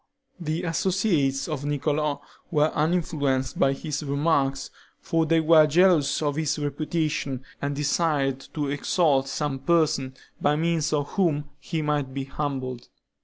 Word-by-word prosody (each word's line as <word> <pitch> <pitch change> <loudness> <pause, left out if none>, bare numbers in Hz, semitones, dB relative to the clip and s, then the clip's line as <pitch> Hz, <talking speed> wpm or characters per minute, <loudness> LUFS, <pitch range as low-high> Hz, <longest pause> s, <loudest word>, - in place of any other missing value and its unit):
The 160 -1 -3
associates 165 -6 +1
of 150 -4 -4
Niccolo 145 0 -1 0.3
were 150 -1 +2
uninfluenced 150 -5 0
by 135 - +4
his 150 +1 -4
remarks; 140 -2 0 0.3
for 165 -1 0
they 165 +1 +4
were 160 -1 +6
jealous 160 -3 +3
of 145 -1 -1
his 155 -1 0
reputation, 150 -2 -2 0.2
and 140 0 -2
desired 145 -2 +1 0.2
to 150 -2 -1
exalt 145 -2 +2
some 135 0 -2
person, 150 -3 +1 0.3
by 145 - +3
means 165 -1 0
of 145 -2 0
whom 150 -7 0
he 160 +2 -3
might 145 -3 -1
be 135 - -2
humbled. 130 -3 -4
150 Hz, 135 wpm, -25 LUFS, 140-160 Hz, 0.3 s, were